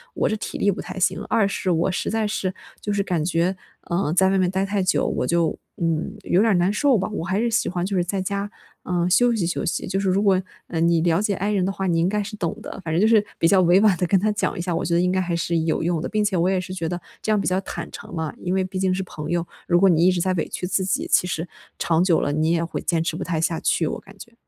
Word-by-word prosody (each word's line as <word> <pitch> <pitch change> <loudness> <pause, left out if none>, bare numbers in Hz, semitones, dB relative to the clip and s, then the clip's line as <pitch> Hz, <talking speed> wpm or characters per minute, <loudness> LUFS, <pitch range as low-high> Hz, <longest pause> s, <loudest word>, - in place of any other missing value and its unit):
我 - - +1
这 215 - 0
体 - - -5
力 205 - +2
不 195 - -5
太 - - -8
行， 180 - +1
2 215 -3 +3
是 195 -1 -2
我 170 +3 +1
实 - - -2
在 220 -1 0
是 195 -3 -2 0.3
就 205 - -3
是 200 -1 +1
感 175 -5 -1
觉， 175 +3 +1 0.3
呃， 170 -3 -1
在 190 +2 +4
外 195 - +2
面 185 -1 +2
待 190 +1 0
太 200 0 -1
久， 185 - +1
我 - - -1
就， 170 -1 +1 0.2
嗯， 165 +4 -1
有 185 - +2
点 225 - +3
儿 - - +3
难 180 +3 +2
受 270 +2 +3
吧， 190 -1 -1
我 185 - -3
还 190 +4 -1
是 235 +1 +1
喜 225 - +1
欢 175 -1 -2
就 195 +1 -2
是 175 - +2
在 190 +2 -2
家， 200 +2 -3 0.3
呃， 175 -1 0
休 240 +7 +4
息 195 -6 0
休 175 - -2
息。 - - -2
就 195 +1 -1
是 195 -1 0
如 190 +2 +2
果， 190 -2 +3 0.3
呃， 165 - -3
你 170 0 +3
了 165 0 +2
解 210 -2 0
I 200 +3 -1
人 195 -3 +1
的 195 - 0
话， 195 0 -3
你 170 -2 +2
应 170 - +2
该 210 +1 0
是 210 +2 -7
懂 170 -5 -2
的”。 - - -8
反 160 - -2
正 170 - +2
就 215 - +5
是 220 -2 +4
比 165 - +4
较 190 +2 +5
委 180 +2 +5
婉 205 -4 +4
地 180 - 0
跟 190 +2 +3
他 210 +3 +1
讲 210 - -1
一 - - -2
下， 175 -1 -2
我 - - -1
觉 170 - -1
得 170 - +3
应 180 0 +2
该 185 - +1
还 175 -2 -1
是 170 0 0
有 160 0 0
用 170 -1 0
的。 - - -3
并 215 -1 0
且 205 -3 0
我 170 +1 +2
也 190 -1 +1
是 185 0 -7
觉 170 -3 -2
得 175 +1 -4 0.2
这 220 - -1
样 210 - +3
比 - - -2
较 185 +1 +1
坦 - - -6
诚 - - -10
嘛， 160 -3 -3
因 180 - -2
为 190 0 +1
毕 185 +1 -5
竟 190 -1 +1
是 190 - -1
朋 155 -4 -7
友， 175 -1 0 0.2
如 175 0 +4
果 195 +1 +5
你 170 -1 +4
一 185 - +6
直 180 -1 -1
在 185 - +1
委 165 - -1
屈 180 - -4
自 190 0 0
己， 190 - -1
其 - - +4
实 165 -1 -3 0.3
长 165 0 +2
久 180 -3 +3
了 145 - 0
你 155 +2 +1
也 170 0 +1
会 165 - -4
坚 165 -2 0
持 165 - -2
不 - - -4
太 165 -3 -2
下 165 0 0
去， 165 - +1
我 - - -3
感 195 0 -16
觉。 235 +3 -12
185 Hz, 335 characters per minute, -23 LUFS, 170-195 Hz, 0.3 s, 一